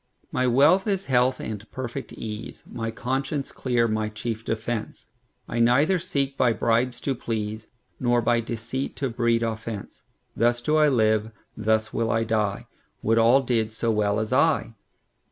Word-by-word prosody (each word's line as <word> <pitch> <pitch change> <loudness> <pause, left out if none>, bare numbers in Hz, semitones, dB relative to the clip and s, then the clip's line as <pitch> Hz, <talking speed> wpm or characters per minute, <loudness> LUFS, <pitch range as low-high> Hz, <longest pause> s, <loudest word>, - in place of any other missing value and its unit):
My 130 0 +1
wealth 145 - +4
is 195 -2 0
health 130 0 +2
and 105 0 -6
perfect 130 -2 -5
ease, 110 0 -7
My 115 -1 -4
conscience 135 +5 -2
clear 120 -3 +1
my 110 -1 -1
chief 110 +1 -5
defence;I 115 +1 -5
neither 140 +10 +4
seek 140 -5 -1
by 125 -3 +3
bribes 120 +2 +1
to 140 - 0
please, 110 -2 -4 0.3
Nor 120 -1 +2
by 120 +1 +3
deceit 115 +3 -4
to 135 -3 -2
breed 115 0 +1
offence:Thus 115 +1 -3
do 150 +5 +1
I 150 -1 +5
live; 110 -4 +2 0.3
thus 110 0 0
will 115 -1 0
I 115 0 +2
die; 110 -3 -1 0.4
Would 115 +1 +3
all 120 +4 +5
did 115 -4 0
so 115 +1 -1
as - - 0
well 105 0 +1
as 110 +3 -2
I! 140 -3 +2
115 Hz, 155 wpm, -25 LUFS, 110-130 Hz, 0.4 s, I